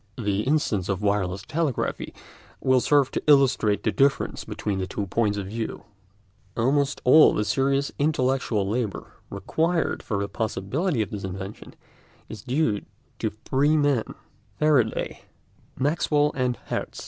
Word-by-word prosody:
The 105 -4 0
instance 110 - 0
of 100 +1 -2
wireless 100 -2 0
telegraphy 155 -5 -2 0.5
will 130 -1 +3
serve 140 -1 +3
to - - -2
illustrate 130 -8 +4
the - - +1
difference 140 0 +1
between 100 -2 -3
the 95 - -2
two 100 +2 -3
points 105 +1 0
of 100 - -3
view. 110 +3 -5 0.7
Almost 140 +4 +1
all 155 +5 +7
the 105 - 0
serious 140 +3 +1
intellectual 130 -8 +1
labour 110 -1 -3 0.2
required 165 +1 -1
for 105 - -3
the 100 0 -1
possibility 110 - -1
of 100 - -9
this 100 -2 -5
invention 95 +1 -7 0.5
is 110 - -8
due 125 -5 0 0.4
to 110 - 0
three 135 +8 +1
men—Faraday, 135 -2 -1 0.6
Maxwell, 150 +1 +1
and 125 -2 -1
Hertz. - - -4
120 Hz, 135 wpm, -25 LUFS, 105-140 Hz, 0.7 s, all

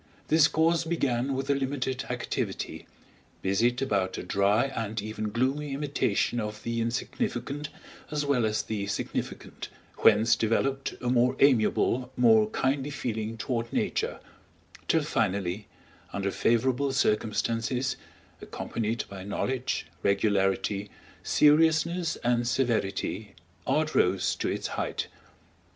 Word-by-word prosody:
This 155 0 +6
course 165 +1 +2
began 135 -5 0
with 135 +1 -3
a - - +5
limited 135 -1 -2
activity, - - -3 0.6
busied 120 +7 +2
about 100 -7 0
a - - -4
dry 100 +4 +2
and 110 -1 -2
even 110 0 -4
gloomy 135 +5 -1
imitation 135 -5 0
of 105 -1 -5
the 115 0 -1
insignificant 125 +4 -2 0.4
as 150 -1 -1
well 140 -4 +2
as 110 0 0
the 105 -2 -3
significant, 100 - -4 0.3
whence 110 +2 +5
developed 135 +5 0
a 125 - -1
more 125 +1 +3
amiable, 125 0 +3
more 110 -3 +5
kindly 135 +4 0
feeling 115 -5 -3
toward 115 -1 -2
Nature, - - -1 0.7
till 160 -2 +3
finally, 100 -6 -1 0.4
under 100 0 -2
favorable 130 +6 +1
circumstances, 115 +1 0 0.5
accompanied 115 0 -3
by 100 -1 -8
knowledge, 125 +6 -2 0.2
regularity, 100 0 +1 0.3
seriousness, 160 +3 +3
and 120 0 +2
severity, 110 -4 -1 0.3
art 155 0 +1
rose 95 +1 +2
to - - -1
its - - -2
height. - - -2
120 Hz, 115 wpm, -28 LUFS, 105-135 Hz, 0.7 s, This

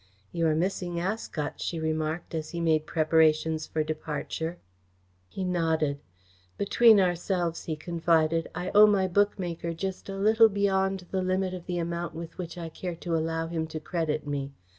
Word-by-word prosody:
"You 165 -1 +1
are 155 - +2
missing 175 0 -1
Ascot," 175 -5 -3
she 165 - -2
remarked, 160 +1 -2
as 155 -1 -3
he 170 - -5
made 160 -2 +2
preparations 160 0 +2
for 155 - -1
departure. 155 +2 -4 0.7
He 190 - -5
nodded. 160 -5 0 0.6
"Between 220 +2 +5
ourselves," 175 -2 0
he 160 - -2
confided, 165 0 +1
"I 180 +1 -3
owe 210 +1 +9
my 195 -2 +3
bookmaker 175 -3 0
just 190 +3 -5
a 195 - -4
little 220 +3 +5
beyond 195 -2 0
the 190 - 0
limit 185 0 0
of 180 -2 -8
the 180 -1 -2
amount 170 -1 -3
with 165 +1 -8
which 175 -1 -6
I 170 -1 -5
care 175 +2 -5
to 170 0 -3
allow 165 0 -1
him 165 -1 -3
to 155 - -5
credit 155 -2 -2
me. 140 -1 -3
170 Hz, 165 wpm, -28 LUFS, 160-185 Hz, 0.7 s, owe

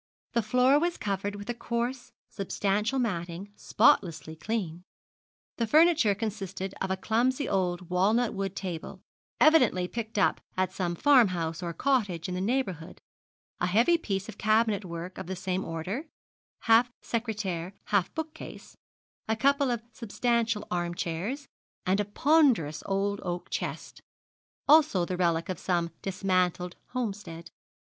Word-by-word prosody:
The 235 - +3
floor 255 +5 +4
was 345 +2 0
covered 200 0 -2
with 205 0 -8
a 240 - -1
coarse, 240 +2 -3 0.2
substantial 205 +4 -1
matting, 185 -4 -3
spotlessly 160 -6 +2
clean. 175 -2 -3 0.8
The 230 - 0
furniture 310 - +5
consisted 195 -3 -4
of 190 - -1
a 190 - 0
clumsy 250 +7 +1
old 180 -2 -1
walnut 215 +6 +2
wood 195 -1 -3
table, 175 -4 -6 0.4
evidently 255 - +5
picked 225 +1 -5
up 200 - +2 0.2
at 185 0 0
some 175 -2 -2
farmhouse 185 - +3
or 170 -1 -3
cottage 200 - 0
in 180 - -4
the 180 - -2
neighbourhood, 190 - -2 0.6
a 175 - +1
heavy 230 - +4
piece 200 - -2
of 215 -2 -10
cabinet 215 -1 +2
work 170 +1 -7
of - - -6
the 190 - -3
same 185 +1 -2
order, 185 - -4 0.5
half 230 +2 +4
secretaire 205 -6 -3 0.2
half 190 -3 +3
bookcase, 320 0 -7 0.5
a 220 - +1
couple 280 +4 +2
of 235 -2 -2
substantial 230 -1 -1
arm 175 -1 -1
chairs, 195 - -3 0.4
and 190 +2 +2
a 205 - +1
ponderous 235 - +3
old 200 +1 0
oak 175 -1 -4
chest - - -4 0.7
also 295 - +5
the 180 - -3
relic 170 -2 +1
of 185 -3 -4
some 170 -2 0
dismantled 185 -2 0
homestead. 195 -9 -5
200 Hz, 140 wpm, -28 LUFS, 180-235 Hz, 0.8 s, furniture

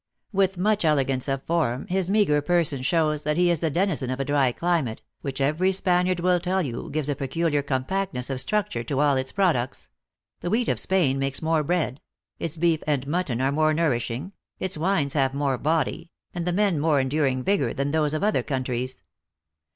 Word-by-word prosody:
With 190 -1 +2
much 210 +2 +1
elegance 135 -4 +1
of 135 -1 -2
form, 145 -7 0
his 185 0 -1
meagre 195 -8 +3
person 155 -4 +1
shows 155 +1 +1
that 150 +1 -1
he 175 0 +4
is 170 - +1
the 160 - 0
denizen 165 -5 0
of 130 +1 -3
a 135 - -1
dry 140 -3 +2
climate, 160 -6 -1 0.2
which, 135 -1 -4
every 155 +7 +2
Spaniard 180 -1 +1
will 180 0 +3
tell 185 +2 0
you, 120 -5 -5
gives 150 -1 -2
a 145 - 0
peculiar 150 +2 0
compactness 140 +1 -2
of 130 - -1
structure 185 - -1
to 135 +3 -2
all 145 -1 +4
its 130 0 -2
products: 165 -11 0 0.5
the 175 - -3
wheat 230 +4 +1
of - - +2
Spain 160 -8 +2
makes 135 +2 -2
more 160 -1 +2
bread, 155 -4 -1 0.4
its 165 0 -4
beef 165 -1 +2
and 140 -3 0
mutton 150 -5 -1
are 135 +1 +2
more 155 +1 +2
nourishing, 135 0 -1 0.3
its 190 0 -2
wines 155 -4 0
have 135 -2 +1
more 140 -3 0
body, 160 +2 -1 0.2
and 175 -1 -3
the 180 - 0
men 195 -3 +2
more 150 -1 +3
enduring 130 -1 0
vigor 145 -10 +1
than 140 +1 -2
those 155 -1 +1
of 155 - -2
other 210 +1 +2
countries. 130 -2 -3
150 Hz, 195 wpm, -25 LUFS, 135-175 Hz, 0.5 s, he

